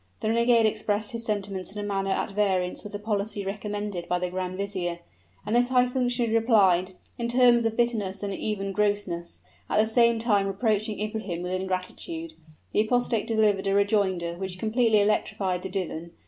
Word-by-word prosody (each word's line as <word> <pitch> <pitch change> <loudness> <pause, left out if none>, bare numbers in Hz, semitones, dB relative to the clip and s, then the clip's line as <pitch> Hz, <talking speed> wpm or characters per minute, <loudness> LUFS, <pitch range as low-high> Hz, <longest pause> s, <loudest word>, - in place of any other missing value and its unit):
The 215 - 0
renegade 235 0 +4
expressed 210 0 -1
his 230 0 -3
sentiments 200 -4 -3
in 210 - -11
a 205 - -3
manner 195 -1 -1
at 195 - -1
variance 190 -3 0
with 210 - -9
the - - -2
policy 205 -1 -2
recommended 205 -2 -4
by 180 - +2
the 180 0 -3
grand 185 0 -3
vizier; 185 -3 -2 0.5
and 215 - 0
this 245 +1 +3
high 250 -1 +4
functionary 245 -2 0
replied, 190 -6 +3 0.3
in 235 - -1
terms 240 -1 +5
of 225 0 -1
bitterness 210 -5 0
and 200 -1 -2
even 195 -1 -2
grossness, 205 -4 -1 0.3
at - - +1
the 215 - +5
same 235 +1 +3
time 210 -4 +2
reproaching 215 +1 0
Ibrahim 210 -5 -3
with 180 - -4
ingratitude. 190 - -4 0.4
The - - +3
apostate 235 -1 0
delivered 210 -3 +2
a 195 - +2
rejoinder 200 -4 +1
which 190 -1 -4
completely 220 +1 +3
electrified 205 -3 0
the 190 - -5
divan. 170 -3 -4
205 Hz, 175 wpm, -26 LUFS, 190-225 Hz, 0.5 s, terms